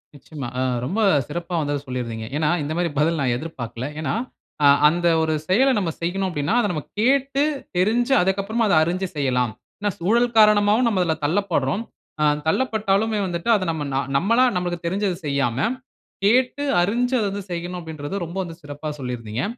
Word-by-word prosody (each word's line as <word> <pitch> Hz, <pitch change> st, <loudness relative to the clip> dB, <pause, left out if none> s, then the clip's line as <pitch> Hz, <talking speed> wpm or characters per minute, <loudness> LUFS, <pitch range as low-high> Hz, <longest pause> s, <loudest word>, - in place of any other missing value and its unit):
நிச்சயமா 140 Hz, -2 st, -8 dB
அ -, -, +1 dB, 0.2 s
ரொம்ப 200 Hz, -, -1 dB, 0.3 s
சிறப்பா 175 Hz, +1 st, -4 dB
வந்து 145 Hz, 0 st, -1 dB
அத 140 Hz, -, -2 dB
சொல்லிருந்தீங்க. 115 Hz, -3 st, -4 dB
ஏன்னா, 150 Hz, -1 st, +1 dB
இந்த 150 Hz, +2 st, -3 dB
மாதிரி 175 Hz, -1 st, +1 dB
பதில் 160 Hz, +1 st, +2 dB
நான் 125 Hz, -3 st, +1 dB
எதிர்பார்க்கல. 125 Hz, -5 st, -6 dB
ஏனா, 155 Hz, -, -1 dB, 0.5 s
ஆ 145 Hz, -, +7 dB, 0.2 s
அந்த 175 Hz, +2 st, +1 dB
ஒரு 160 Hz, 0 st, +1 dB
செயல 255 Hz, +8 st, +4 dB
நம்ம 185 Hz, -5 st, 0 dB
செய்யனும் 190 Hz, +3 st, -1 dB
அப்படினா, 145 Hz, -1 st, -1 dB
அத 205 Hz, -, 0 dB
நம்ம 155 Hz, -4 st, -3 dB, 0.2 s
கேட்டு, 275 Hz, +3 st, +2 dB, 0.3 s
தெரிஞ்சு, 235 Hz, +8 st, +2 dB
அதுக்கு 190 Hz, +2 st, +1 dB
அப்புறம் 225 Hz, +3 st, -1 dB
அத 200 Hz, -, +2 dB
அறிஞ்சு 185 Hz, +3 st, -1 dB
செய்யலாம். 125 Hz, -4 st, 0 dB, 0.3 s
ஏனா, 205 Hz, 0 st, 0 dB
சூழல் 230 Hz, +6 st, +2 dB
காரணமாவும் 210 Hz, +2 st, +5 dB
நம்ம 200 Hz, -5 st, +1 dB
அதில 160 Hz, -2 st, 0 dB
தள்ளப்பட்றோம். 175 Hz, -, 0 dB, 0.4 s
ஆ -, -, +3 dB, 0.2 s
தள்ளப்பட்டாலுமே 220 Hz, -1 st, +1 dB
வந்துட்டு 175 Hz, +5 st, -3 dB
அத 195 Hz, -, 0 dB
நம்ம 155 Hz, -2 st, -3 dB, 0.3 s
நம்மளா 230 Hz, -, +3 dB
நமக்கு 175 Hz, -1 st, -2 dB
தெரிஞ்சது 190 Hz, +1 st, 0 dB
செய்யாம, 140 Hz, -4 st, 0 dB, 0.7 s
கேட்டு 250 Hz, +6 st, +2 dB, 0.2 s
அறிஞ்சு 240 Hz, +7 st, 0 dB
அத 215 Hz, -, 0 dB
வந்து 200 Hz, 0 st, -5 dB
செய்யனும் 175 Hz, +1 st, -4 dB
அப்படின்றது 155 Hz, +1 st, -6 dB
ரொம்ப 170 Hz, +3 st, -8 dB
வந்து 165 Hz, -2 st, -8 dB
சிறப்பா 145 Hz, +1 st, -7 dB
சொல்லியிருந்தீங்க. 125 Hz, -2 st, -4 dB
175 Hz, 170 wpm, -22 LUFS, 145-210 Hz, 0.7 s, ஆ